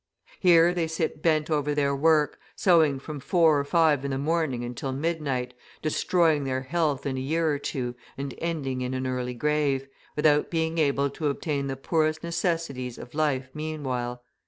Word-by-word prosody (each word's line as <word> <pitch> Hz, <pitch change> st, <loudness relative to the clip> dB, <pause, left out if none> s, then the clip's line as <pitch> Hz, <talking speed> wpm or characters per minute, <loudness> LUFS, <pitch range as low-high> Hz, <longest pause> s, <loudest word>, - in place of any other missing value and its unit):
Here 175 Hz, -1 st, +6 dB
they 170 Hz, -2 st, 0 dB
sit 160 Hz, -1 st, -2 dB
bent 155 Hz, -1 st, +2 dB
over 150 Hz, -1 st, +1 dB
their 140 Hz, -1 st, +1 dB
work, 150 Hz, +1 st, +3 dB, 0.2 s
sewing 160 Hz, -7 st, +4 dB
from 145 Hz, +2 st, -7 dB
four 160 Hz, 0 st, +3 dB
or -, -, 0 dB
five 150 Hz, -2 st, +3 dB
in 140 Hz, -, -2 dB
the 135 Hz, -, -1 dB
morning 150 Hz, -4 st, 0 dB
until 125 Hz, +2 st, -4 dB
midnight, 135 Hz, -4 st, -2 dB, 0.3 s
destroying 155 Hz, -1 st, +2 dB
their 130 Hz, -1 st, -1 dB
health 150 Hz, -1 st, 0 dB
in 135 Hz, -2 st, -2 dB
a -, -, -2 dB
year 160 Hz, +4 st, +1 dB
or 145 Hz, -, -1 dB
two 125 Hz, -3 st, -3 dB, 0.2 s
and 135 Hz, -1 st, -4 dB
ending 140 Hz, -6 st, -2 dB
in 125 Hz, +1 st, -2 dB
an 130 Hz, 0 st, -2 dB
early 125 Hz, -1 st, -2 dB
grave, 140 Hz, 0 st, 0 dB, 0.3 s
without 150 Hz, 0 st, +3 dB
being 165 Hz, 0 st, -1 dB
able 140 Hz, -2 st, +2 dB
to 150 Hz, +2 st, -2 dB
obtain 140 Hz, -1 st, -1 dB
the 135 Hz, -1 st, -3 dB
poorest 155 Hz, +3 st, 0 dB
necessities 165 Hz, -7 st, -2 dB
of 125 Hz, -, -10 dB
life 145 Hz, -4 st, 0 dB
meanwhile. 130 Hz, -6 st, -4 dB
145 Hz, 175 wpm, -26 LUFS, 135-160 Hz, 0.3 s, Here